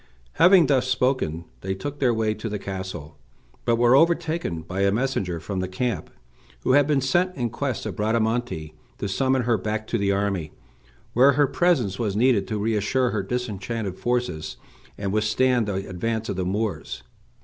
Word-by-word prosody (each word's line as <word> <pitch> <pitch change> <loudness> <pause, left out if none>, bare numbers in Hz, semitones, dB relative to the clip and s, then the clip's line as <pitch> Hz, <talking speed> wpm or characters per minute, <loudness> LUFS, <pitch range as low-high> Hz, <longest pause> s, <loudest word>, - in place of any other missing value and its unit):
Having 180 -1 +7
thus 135 -3 +2
spoken, 125 - 0
they 95 0 -3
took 145 +8 -6
their 130 -3 +3
way 110 -2 0
to 115 - -5
the 105 - -3
castle, 95 -6 -7 0.5
but 120 - +3
were 120 +2 +5
overtaken 165 - +1
by 95 +4 -4
a 100 0 +3
messenger 100 -7 -1
from 95 +3 -4
the 95 - -1
camp, 110 +4 -2 0.5
who - - +1
had 145 +1 +5
been 145 -3 +2
sent 175 +8 +1
in 120 -4 -2
quest 135 -5 -3
of - - -5
Bradamante 110 -6 -1 0.2
to 100 - -3
summon 130 +6 +1
her 115 -3 +1
back 110 +2 -3
to 115 - -1
the 100 0 +1
army, 100 -6 -1 0.6
where 135 +4 +6
her 145 +1 +4
presence 130 - +1
was 105 -4 -1
needed 115 -3 +3
to 110 - -2
reassure 110 +4 +1
her 105 - -1
disheartened 105 -2 -3
forces, 120 -10 -2 0.4
and 100 -1 -3
withstand 110 +2 +2
the 95 -1 -3
advance 110 +4 -3
of - - -2
the 95 -1 -2
Moors. 105 +3 -3
110 Hz, 175 wpm, -24 LUFS, 95-130 Hz, 0.6 s, Having